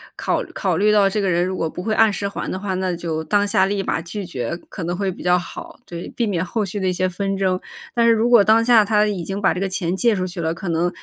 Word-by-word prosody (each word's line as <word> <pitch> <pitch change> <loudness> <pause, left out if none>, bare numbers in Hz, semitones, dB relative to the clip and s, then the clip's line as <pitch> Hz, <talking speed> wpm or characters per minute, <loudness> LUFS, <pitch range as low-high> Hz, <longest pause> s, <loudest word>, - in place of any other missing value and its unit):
考 - - -1
考 185 -5 0
虑 210 +2 +3
到 205 -2 +4
这 210 - -1
个 195 -2 +1
人 175 +1 +2
如 185 0 -3
果 160 - -1
不 180 - -7
会 220 0 -1
按 220 -1 +4
时 200 0 -2
还 - - -5
的 185 - -3
话， 195 -1 -3
那 185 -1 -1
就 165 -2 -3
当 205 +5 +2
下 200 -2 +3
立 195 0 -1
马 - - -1
拒 180 +4 -6
绝 135 -3 -4
可 185 - -6
能 175 +1 -2
会 195 0 -1
比 - - -11
较 180 0 +3
好， 180 - -8
对， 170 0 -7
避 235 - 0
免 185 -4 -1
后 215 +4 -2
续 200 +1 -4
的 190 - -1
一 180 - +1
些 185 +1 0
纷 195 +2 -2
争。 185 -1 0 0.3
但 235 -1 +2
是 230 - +6
如 225 +2 +1
果 235 -3 +7
当 220 +3 +4
下 230 -3 +5
他 210 0 +3
已 200 -4 -2
经 195 +1 -4
把 195 - +3
这 180 - -4
个 195 - 0
钱 180 -2 -2
借 235 -1 +3
出 185 -2 -1
去 180 -1 -7
了， 160 -1 -1
可 170 +1 -6
能 170 +2 +1
190 Hz, 320 characters per minute, -21 LUFS, 175-205 Hz, 0.3 s, 果